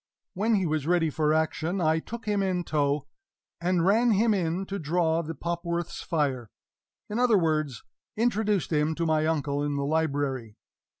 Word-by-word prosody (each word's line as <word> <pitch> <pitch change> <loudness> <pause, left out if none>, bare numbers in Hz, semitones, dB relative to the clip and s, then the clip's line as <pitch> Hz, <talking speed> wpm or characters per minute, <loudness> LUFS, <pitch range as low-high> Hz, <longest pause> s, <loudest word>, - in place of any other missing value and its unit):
When 215 +4 +1
he 190 -3 +1
was 155 -2 -1
ready 170 -3 +2
for 150 0 +1
action, 160 +3 0
I 160 -1 +2
took 230 +6 -8
him 205 -2 +1
in 185 -2 0
tow, 145 -2 0 0.6
and 175 -1 +1
ran 225 +5 +4
him 220 +2 +3
in 180 0 -1
to 200 +1 -4
draw 165 +1 +1
the 165 0 -6
Popworth's 170 +2 -3
fire 135 -8 -1 0.6
in 215 +3 -3
other 245 -4 +4
words, 155 - 0 0.3
introduced 215 -5 +1
him 150 +1 +1
to 170 - -1
my 155 -1 +2
uncle 145 -3 0
in 145 0 -1
the 140 0 -1
library. 140 -7 -1
165 Hz, 170 wpm, -27 LUFS, 150-190 Hz, 0.6 s, ran